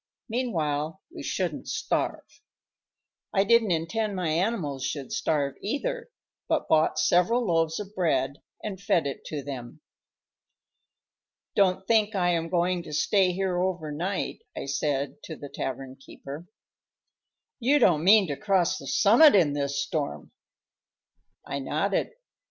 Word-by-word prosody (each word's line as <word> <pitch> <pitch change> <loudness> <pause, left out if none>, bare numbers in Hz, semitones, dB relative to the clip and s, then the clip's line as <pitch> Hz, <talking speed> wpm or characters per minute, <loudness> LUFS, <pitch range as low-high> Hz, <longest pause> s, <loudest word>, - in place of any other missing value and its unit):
Meanwhile 165 - -2 0.2
we - - -6
shouldn't - - -3
starve. - - -1 1.1
I 195 - +5
didn't 230 +1 +4
intend 195 +6 -1
my 180 -3 -1
animals 160 - -1
should 140 -1 -4
starve, 145 -3 0
either, 475 - -3 0.4
but - - 0
bought 155 0 +3
several 180 +10 +3
loaves 165 -2 +1
of 205 0 -7
bread 140 -8 0 0.2
and 195 -3 -5
fed 175 -5 +2
it 140 -2 -4
to 145 -3 -5
them. 130 -4 -7 1.8
"Don't 190 -1 +2
think 220 -1 +2
I 175 -2 +2
am 165 -1 -1
going 175 0 +1
to 160 -3 -9
stay 185 +5 +3
here 180 -1 -1
over 180 -5 -2
night," 180 +6 -3 0.2
I - - -4
said 140 0 -2
to 160 - -6
the 145 -1 -9
tavern 130 0 -5
keeper. 140 +4 -10 1.1
"You 265 +4 +3
don't 165 - +4
mean 200 +1 +6
to 145 - -1
cross 195 -4 +1
the - - -9
summit 220 +7 +6
in 165 -7 +4
this 140 0 -1
storm!" 150 -4 -4 1.1
I 140 - -3
nodded. 155 +9 0
175 Hz, 135 wpm, -27 LUFS, 145-200 Hz, 1.8 s, mean